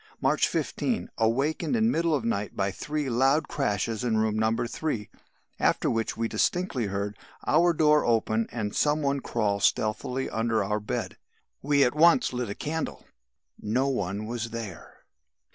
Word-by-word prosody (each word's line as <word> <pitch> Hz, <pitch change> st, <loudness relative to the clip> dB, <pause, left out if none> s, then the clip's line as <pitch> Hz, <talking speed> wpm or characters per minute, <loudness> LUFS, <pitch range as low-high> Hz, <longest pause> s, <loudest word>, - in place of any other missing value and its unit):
"March -, -, +2 dB
15. 235 Hz, -4 st, -2 dB
Awakened 135 Hz, -, +1 dB
in 225 Hz, 0 st, +3 dB
middle 165 Hz, -4 st, +1 dB
of 130 Hz, -5 st, -2 dB
night 105 Hz, -3 st, -2 dB
by 100 Hz, 0 st, 0 dB
three 150 Hz, +8 st, -3 dB
loud 135 Hz, +5 st, +2 dB
crashes 110 Hz, -3 st, -1 dB
in 115 Hz, -3 st, +1 dB
room 110 Hz, -1 st, +1 dB
No. 110 Hz, 0 st, +2 dB, 0.2 s
3, 120 Hz, -6 st, -3 dB, 0.5 s
after -, -, +2 dB
which 115 Hz, -1 st, -1 dB
we 115 Hz, 0 st, 0 dB
distinctly 140 Hz, -, 0 dB
heard 100 Hz, +1 st, -3 dB, 0.3 s
our 170 Hz, +3 st, +4 dB
door 150 Hz, -2 st, +4 dB
open 115 Hz, -1 st, +1 dB
and 105 Hz, -3 st, -3 dB
some 150 Hz, 0 st, +2 dB
one 140 Hz, 0 st, +1 dB
crawl 100 Hz, -5 st, -1 dB
stealthily 110 Hz, +6 st, 0 dB
under 115 Hz, 0 st, 0 dB
our 105 Hz, 0 st, -1 dB
bed. 105 Hz, -, -4 dB, 0.4 s
"We 140 Hz, 0 st, +3 dB
at 125 Hz, -, +2 dB
once 160 Hz, -3 st, +4 dB
lit 125 Hz, -3 st, -2 dB
a 100 Hz, -, -4 dB
candle 160 Hz, +1 st, -4 dB, 0.6 s
no 125 Hz, +6 st, +1 dB
one 100 Hz, -4 st, -2 dB
was 120 Hz, +1 st, -4 dB
there. 110 Hz, -7 st, -8 dB
120 Hz, 160 wpm, -27 LUFS, 110-150 Hz, 0.6 s, our